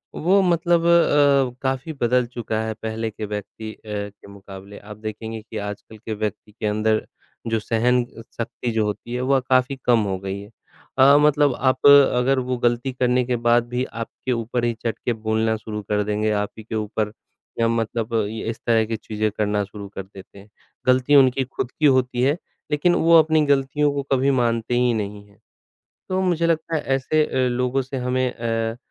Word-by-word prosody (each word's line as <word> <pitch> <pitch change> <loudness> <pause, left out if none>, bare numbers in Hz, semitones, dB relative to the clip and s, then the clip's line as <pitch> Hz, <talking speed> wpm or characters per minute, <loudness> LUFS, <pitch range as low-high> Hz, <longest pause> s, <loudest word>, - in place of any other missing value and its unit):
वो 190 +5 +3
मतलब 170 -1 +2
अ, 145 -6 +4
काफ़ी 135 +4 -2
बदल 125 +1 +2
चुका 110 -2 -2
है 110 0 -3
पहले 110 0 -3
के 110 +1 -6
व्यक्ति 105 +1 -6
अ, - - -20
के 100 -1 -6
मुक़ाबले। 100 0 -11
आप 105 0 -11
देखेंगे 110 +1 -6
कि 110 0 -9
आजकल 105 +2 -10
के 110 +1 -6
व्यक्ति 105 0 -4
के 105 - -7
अंदर 110 +1 +1 0.4
जो 115 -1 0
सहन 120 +3 +1 0.3
शक्ति 120 +1 -3
जो 110 -1 +1
होती 105 +3 -5
है 125 - -2
वह 135 - +4
काफ़ी 130 +1 +3
कम 120 -2 +4
हो 95 - -1
गई 95 +1 -5
है 100 +1 -11 0.5
अ, 140 +2 +7
मतलब 145 -2 +3
आप 130 0 0
अगर 135 -2 +6
वो 125 0 -2
गलती 120 +2 -1
करने 125 0 +1
के 125 0 0
बाद 120 0 +3
भी 125 +1 -1 0.2
आपके 130 - -6
ऊपर 120 0 -2
ही 120 - +1
चढ़के 120 +1 -2
बोलना 110 0 0
शुरू 105 -1 -6
कर 105 0 +1
देंगे 105 +1 -1
आप 105 - -5
ही 110 - -9
के 110 - -6
ऊपर 105 0 -2 0.5
या 115 - +3
मतलब 115 0 -2
इस 110 +2 -5
तरह 115 -2 +3
की 115 +1 -3
चीज़ें 110 0 -2
करना 105 -1 0
शुरू 100 0 -9
कर 95 - -4
देते 95 +1 -14
हैं। 100 +2 -16 0.4
गलती 130 +3 +4
उनकी 135 -1 +5
ख़ुद 130 -1 -5
की 155 - -1
होती 130 -3 +3
है 140 +5 +2 0.3
लेकिन 150 +4 +2
वो 165 0 +5
अपनी 160 0 +3
गलतियों 140 +1 +2
को 140 -1 -2
कभी 135 +1 +3
मानते 120 -2 0
ही 125 0 +2
नहीं 105 -2 -4
है, 100 - -24 0.7
तो 185 0 0
मुझे 170 -3 +1
लगता 165 0 0
है - - -1 0.2
ऐसे 155 +4 +1
अ, 130 -1 0
लोगों 125 +2 0
से 135 +1 -7
हमें 125 0 0
अ, 115 -1 -2
120 Hz, 190 wpm, -22 LUFS, 110-135 Hz, 0.7 s, अ